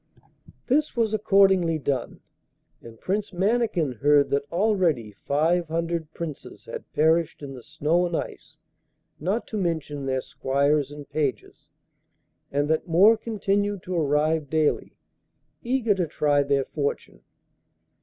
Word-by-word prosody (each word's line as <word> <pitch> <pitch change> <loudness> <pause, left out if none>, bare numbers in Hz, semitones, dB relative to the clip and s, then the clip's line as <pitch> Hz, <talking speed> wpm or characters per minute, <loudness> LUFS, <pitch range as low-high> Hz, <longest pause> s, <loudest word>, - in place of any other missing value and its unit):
This 295 +3 +1
was 225 -2 +1
accordingly 195 -5 +3
done, 135 -4 -3 0.6
and 115 -1 -13
Prince 205 +3 -2
Mannikin 190 - 0
heard 145 0 +4
that 140 0 -1
already 170 - +1
five 160 - 0
hundred 165 -1 -2
Princes 160 -4 -7
had - - -8
perished 160 0 +2
in 135 -1 -7
the 125 - -10
snow 160 +5 0
and 170 - -2
ice, 155 - -7 0.6
not 195 +9 -1
to 215 - -3
mention 155 -6 -2
their 130 0 0
squires 140 +2 0
and 145 -1 -10
pages, 140 -8 -3 0.8
and 145 +1 0
that 160 +3 0
more 190 +7 +6
continued 205 -3 -1
to 185 - -4
arrive 155 -1 +1
daily, 155 0 0 0.7
eager 240 -3 +1
to 180 -4 -1
try 145 -1 +2
their 140 -1 +1
fortune. 140 - -4
160 Hz, 130 wpm, -25 LUFS, 145-195 Hz, 0.8 s, more